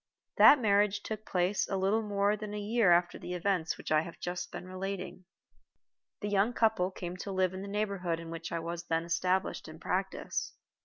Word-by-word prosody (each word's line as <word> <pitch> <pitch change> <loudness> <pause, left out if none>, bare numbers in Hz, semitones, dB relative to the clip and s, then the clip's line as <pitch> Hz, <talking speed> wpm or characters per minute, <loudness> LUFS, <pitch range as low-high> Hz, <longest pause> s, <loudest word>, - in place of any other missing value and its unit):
That 295 - +9
marriage 205 -2 +2
took 215 0 -6
place 180 +2 +1
a 195 - 0
little 195 +4 +2
more 205 -1 +1
than 210 0 -6
a - - -3
year 210 -2 +3
after 175 0 +3
the 180 - -5
events 180 -2 0
occurred - - -14
which - - -7
I 155 0 +5
have 165 +1 -9
just 175 0 -4
been 180 - -7
relating. 185 0 -5 1.0
The 205 - -2
young 205 +3 +2
couple 220 -6 +2
came 180 -1 -6
to 195 - -5
live 185 -1 +1
in 185 - -5
the 200 - -6
neighborhood 200 -5 -1
in 165 0 -8
which 165 0 -6
I 170 - -1
was 170 +1 -5
then 165 0 +1
established 180 +2 0
in - - -10
practice. - - -2
190 Hz, 205 wpm, -31 LUFS, 175-205 Hz, 1.0 s, That